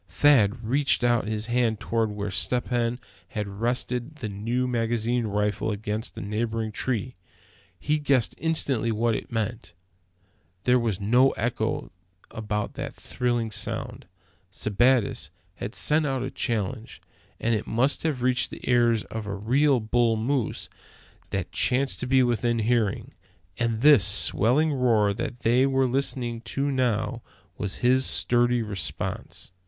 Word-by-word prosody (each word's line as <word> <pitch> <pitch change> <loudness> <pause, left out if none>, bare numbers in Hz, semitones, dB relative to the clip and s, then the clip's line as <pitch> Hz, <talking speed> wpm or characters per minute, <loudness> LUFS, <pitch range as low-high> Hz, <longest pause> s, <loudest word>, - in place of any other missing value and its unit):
Thad 120 -6 +3
reached 135 +1 +2
out 120 -3 +2
his 110 0 -2
hand 120 -2 +1
toward 115 -1 0
where 105 -1 -4
Step 120 +6 0
Hen 120 0 0 0.3
had 105 +1 -4
rested 120 +6 -2
his 110 -5 -4
new 115 +6 -1
magazine 120 0 0
rifle 105 +1 -1
against 105 +2 -4
a - - -4
neighboring 110 +2 -2
tree. 125 +2 -2 0.7
He 150 +1 0
guessed 140 -5 +2
instantly 140 -8 +1
what 115 +1 +1
it - - -6
meant. 110 -5 -3 0.9
There 125 0 +4
was 110 -5 -1
no 120 +6 +4
echo 120 +2 -2 0.4
about 105 -1 -3
that - - -6
thrilling 120 -3 -2
sound! 100 - -5 0.4
Sebattis 110 -4 +1 0.3
had 105 +4 -6
sent 150 0 +2
out 135 -2 -1
a 130 - -4
challenge, 115 0 -3 0.4
and 115 - +1
it 110 - -2
must 125 +5 +1
have 145 -6 -1
reached 125 0 +2
the - - -10
ears 120 -3 +3
of 110 -2 -6
a 100 - -3
real 130 +6 +2
bull 115 +1 +1
moose 125 +2 -1 0.6
that - - -3
chanced 135 +2 +1
to 125 - -3
be 130 0 +4
within 120 -1 +1
hearing; 115 -2 0 0.5
and 115 -2 0
this 145 -7 +7
swelling 115 - +2
roar 115 -6 +2
that 120 +4 -5
they 125 +4 +3
were 135 -1 +2
listening 125 -2 -1
to 135 +4 -2
now 120 -2 0 0.4
was 100 -2 -2
his 130 +1 +4
sturdy 120 -1 +2
response. 95 -5 -5
120 Hz, 145 wpm, -26 LUFS, 110-125 Hz, 0.9 s, this